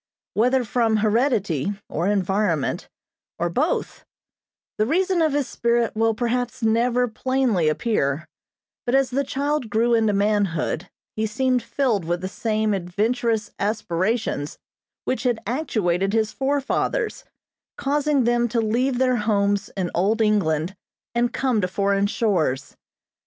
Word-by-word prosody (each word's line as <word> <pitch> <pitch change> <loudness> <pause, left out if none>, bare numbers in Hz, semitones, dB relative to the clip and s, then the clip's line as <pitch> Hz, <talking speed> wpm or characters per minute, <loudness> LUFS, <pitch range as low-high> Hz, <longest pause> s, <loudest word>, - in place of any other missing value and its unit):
Whether 250 +4 +2
from 225 0 +1
heredity, 210 - +1
or 170 +4 -2
environment, 195 -5 0 0.5
or 170 0 -1
both, 295 - -1 0.8
the 215 - +2
reason 365 +4 +2
of 310 -3 +2
his 285 -2 0
spirit 235 -1 0
will 225 0 +2
perhaps 240 0 -2
never 240 +2 +2
plainly 235 -7 +1
appear, 155 - 0 0.6
but 245 - +2
as 270 -2 +2
the 275 +3 +1
child 280 -2 -1
grew 230 +3 +2
into 220 -2 +3
manhood 200 -4 0 0.3
he 220 0 0
seemed 255 +3 +1
filled 235 -5 0
with 175 +1 -1
the 185 - -3
same 215 +1 -1
adventurous 215 +4 -1
aspirations 200 -5 -1 0.5
which 260 - -1
had 245 -4 0
actuated 200 - 0
his 220 -1 +1
forefathers, 285 - -1 0.5
causing 290 -1 +1
them 240 0 +2
to 235 0 -1
leave 240 +4 +1
their 255 -1 +2
homes 205 -2 +1
in 180 -2 -1
old 205 +6 +1
England, 190 -5 +1 0.4
and 240 0 +1
come 255 -4 +1
to 180 - +1
foreign 200 +1 +1
shores. 165 - 0
220 Hz, 130 wpm, -23 LUFS, 200-250 Hz, 0.8 s, into